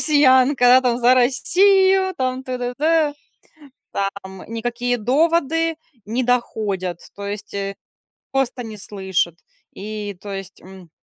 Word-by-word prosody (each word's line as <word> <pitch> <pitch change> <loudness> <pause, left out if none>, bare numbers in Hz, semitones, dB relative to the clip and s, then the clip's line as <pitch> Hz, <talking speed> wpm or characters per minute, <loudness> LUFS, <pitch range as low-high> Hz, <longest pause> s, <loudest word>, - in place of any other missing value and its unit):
россиянка, 265 -3 +4
она 250 +1 +7
там 245 -1 +1
за 245 +1 +5
Россию, 380 +9 +3
там 255 0 -2
т 255 -1 -4
д 245 0 -3
д 310 -1 +2 0.8
там 195 -1 -4
никакие 240 +2 -2
доводы 325 +6 +1 0.3
не 235 +4 -1
доходят, 205 -7 -1 0.2
то 200 0 -6
есть, 205 0 -6
э, 195 0 -3 0.6
просто 265 -2 -1
не 220 -1 -8
слышит. 190 -4 -2 0.4
И 205 -1 -6
то 200 0 -7
есть, 195 -1 -8
м, 185 -2 -14
245 Hz, 130 wpm, -21 LUFS, 200-270 Hz, 0.8 s, она